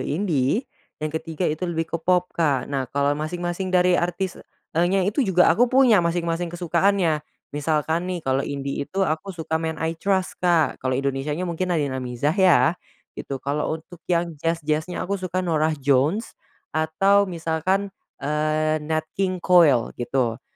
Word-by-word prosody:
indie, 165 - 0 0.3
yang 155 0 -4
ketiga 160 +2 -3
itu 160 +4 -1
lebih 165 -1 -1
ke - - +1
pop 180 +1 +1
Kak, 145 -6 +1
nah 135 -2 -3
kalau 140 0 +1
masing-masing 175 +5 -3
dari 180 0 +3
artisnya, 180 +1 -1 0.3
eee, 170 +2 +2
nya 195 +1 +2
itu 210 +8 0
juga 190 -7 +4
aku 240 +8 +3
punya 255 -5 +5
masing-masing 170 0 -1
kesukaannya 175 -1 +1 0.3
misalkan 160 +4 0
nih 180 -1 -2
kalau 130 0 +1
indie 140 0 -4
itu 195 0 0
aku 160 +4 -2
suka 160 -1 -2
Men 160 -1 -3
I 160 0 -1
Trust 190 +2 0
Kak 170 -3 +2
kalau 130 - -1
Indonesianya 140 +5 -2
mungkin 175 +2 -2
ada 175 - +2
yang 145 -3 -1
Nadin 130 -1 -4
Amizah 125 +5 0
ya, 175 -9 +5 0.4
gitu 135 - -5
kalau 145 +4 -2
untuk 165 +2 -15
yang 170 -1 +1
jazz-jazz-nya 165 +1 -1
aku 200 +1 -2
suka 185 0 -2
Norah 160 -2 +1
Jones, 145 - +1 0.4
atau 195 +6 +2
misalkan, 175 +4 -1 0.2
eee, 155 +2 0
Nat 155 0 0
King 185 -2 -2
Cole 155 -10 +5
gitu. 120 -1 -1
165 Hz, 165 wpm, -23 LUFS, 150-180 Hz, 0.4 s, punya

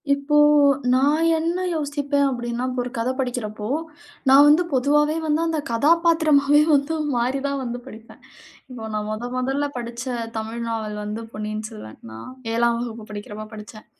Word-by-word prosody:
இப்போ 280 +1 0 0.6
நான் 290 +5 +3
என்ன 340 +3 -1
யோசிப்பேன்? 285 -2 -1
அப்படின்னா, 240 -1 -3
இப்ப 250 0 -4
ஒரு 245 - -6
கதை 230 +3 0
படிக்கிறப்போ, 230 -5 -3 0.6
நான் 275 +2 +8
வந்து 305 +4 +5
பொதுவாவே 295 +4 +2
வந்து, 305 +1 +1
அந்த 325 -1 -1
கதாபாத்திரமாவே 300 +1 +4
வந்து 280 +3 0 0.2
மாறி 250 +3 0
தான் 280 0 -2
வந்து 245 0 -4
படிப்பேன். 220 +1 -13 0.5
இப்போ 250 -3 -8
நான் 210 0 -2
மொதன் 235 +3 -4
மொதல்ல 270 +3 0
படிச்ச 240 0 -5 0.3
தமிழ் 220 +1 -4
நாவல் 220 -2 -3
வந்து 210 +2 -5
பொன்னியின் 215 0 -4
செல்வன். 110 - -11
நான் 110 0 -9 0.3
7ஆம் 235 0 +2
வகுப்பு 230 -2 -6
படிக்கிறப்ப 210 +1 -7
படிச்சேன். 215 0 -11
250 Hz, 150 wpm, -22 LUFS, 220-290 Hz, 0.6 s, நான்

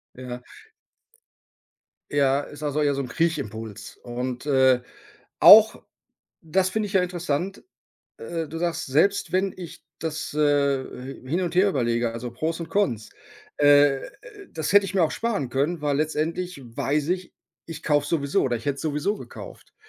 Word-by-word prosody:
Ja. 125 -1 -7 1.7
Ja, 140 -1 +2
ist 145 +1 -10
also 150 0 -1
eher 145 -1 +2
so 140 - -2
'n 130 - -7
Kriechimpuls 115 - -3
und, 125 +2 -5
äh, 130 -3 +4 0.6
auch - - +8 0.6
das 185 +3 +1
finde 215 +1 -1
ich 200 - -8
ja 190 - +3
interessant. 175 +1 -3 0.5
Äh, 165 -2 -4
du 165 - -6
sagst: 170 0 -2
„Selbst 160 +9 +1
wenn 190 +1 +1
ich 175 -3 -10
das, 160 -1 -4
äh, 150 - 0 0.4
äh, 130 0 -10
hin 175 +5 0
und 175 -1 -3
her 195 +2 +5
überlege, 120 -6 0
also, 120 +1 -6
Pros 160 +8 -3
und 165 - -6
Cons, 120 - 0 0.5
äh, 145 -1 +5 0.5
das 160 +2 -2
hätte 205 0 +6
ich 195 - -5
mir 190 - +3
auch 160 - +2
sparen 220 - -2
können, 145 +7 -1
weil 145 -1 +1
letztendlich 155 +2 -2
weiß 140 +5 -2
ich, 180 0 -3 0.3
ich 160 -2 -8
kaufe 145 -2 +2
es - - -6
sowieso, 140 -4 +1
oder 120 -3 0
ich 115 - -10
hätte 140 -1 0
es - - -8
sowieso 155 +7 -1
gekauft.“ - - -11
150 Hz, 165 wpm, -24 LUFS, 135-175 Hz, 1.7 s, auch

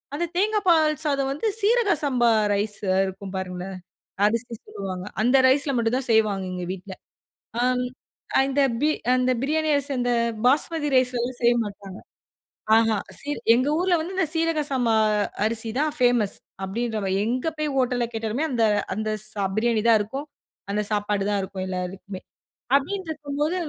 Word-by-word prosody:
அந்த 345 +4 -1
தேங்கா 420 +4 +2
பால் 315 -3 +5
சாதம் 275 -3 0
வந்து 295 +11 -2
சீரக 445 0 +3
சம்பா 250 -5 +2 0.2
ரைஸ் 205 0 0 0.3
இருக்கும் 190 +1 -7
பாருங்களேன். 185 0 -5 0.5
அரிசி 230 +3 0
சொல்லுவாங்க 185 -2 -6 0.2
அந்த 250 +4 +4
ரைஸ்ல் 275 +2 +3
மட்டும் 235 +1 +1
தான் 260 -1 -2
செய்வாங்க 210 -3 +2
எங்க 180 -1 -4
வீட்ல. 190 +1 -8 0.7
அம். 250 0 +1 0.5
அந்த 270 +1 +2 0.2
பி 300 - +3 0.3
அந்த 255 0 +2
பிரியாணி 310 +3 0
அரிசி 285 0 -1
அந்த 245 0 +1 0.3
பாஸ்மதி 295 +3 +2
ரைஸ்லலாம் 250 -1 +1
செய்ய 240 0 +5
மாட்டாங்க. 200 -1 -9 0.8
ஆஹ, 225 -1 +3 0.2
சி 285 - -9 0.3
எங்க 255 +4 +1
ஊர்ல 360 -1 +2
வந்து 345 +4 -5
இந்த 375 - +2
சீரகம் 325 -2 0
சாமா 245 -4 +1 0.5
அரிசி 225 0 -2
தான் 305 0 +1
ஃப்மஸ் 245 -5 +2 0.3
அப்டின்ற 220 +3 -2
மாரி 190 -1 0
எங்க 250 +5 -1
போய் 305 -1 -1
ஹோட்டல்ல 250 -2 +1
கேட்டாலுமே 225 +6 -2
அந்த 235 -3 +1 0.3
அந்த 215 +2 -3 0.2
ஸ 200 -2 -1
பிரியாணி 225 -1 +1
தான் 225 -1 +6
இருக்கும். 270 +8 -6 0.5
அந்த 210 +1 0
சாப்பாடு 205 -1 0
தான் 205 -1 +1
இருக்கும் 190 0 -5
எல்லாருக்குமே. 185 +1 -5 0.6
அப்டின்ருக்கும் 300 -3 -5
போது 310 +4 +1
245 Hz, 150 wpm, -24 LUFS, 205-290 Hz, 0.8 s, தான்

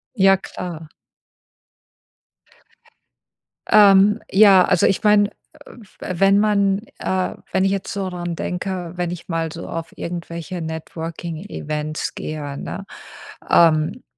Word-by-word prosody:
Ja, 195 -2 +5
klar. 170 -4 -8 2.8
Ähm, 205 +1 +6
ja, 195 -2 +7
also 175 - +3
ich 195 - +1
meine, 210 -1 +5
äh, - - -18 0.5
f 205 - -21
wenn 195 +2 +2
man, 200 -2 +2 0.2
äh 185 -1 -1 0.2
wenn 190 0 +2
ich 195 - +2
jetzt 195 -1 -3
so 195 -2 -3
dran 175 -1 -4
denke, 180 0 -4
wenn 175 -1 -2
ich 175 0 -8
mal 165 -2 -2
so 165 - -8
auf 165 0 -6
irgendwelche 170 +1 -6
Networking-Events 160 -1 -5
gehe, 145 -2 -5
ne, 195 - -6 0.7
ähm, 165 +7 +3
180 Hz, 120 wpm, -21 LUFS, 165-195 Hz, 2.8 s, ja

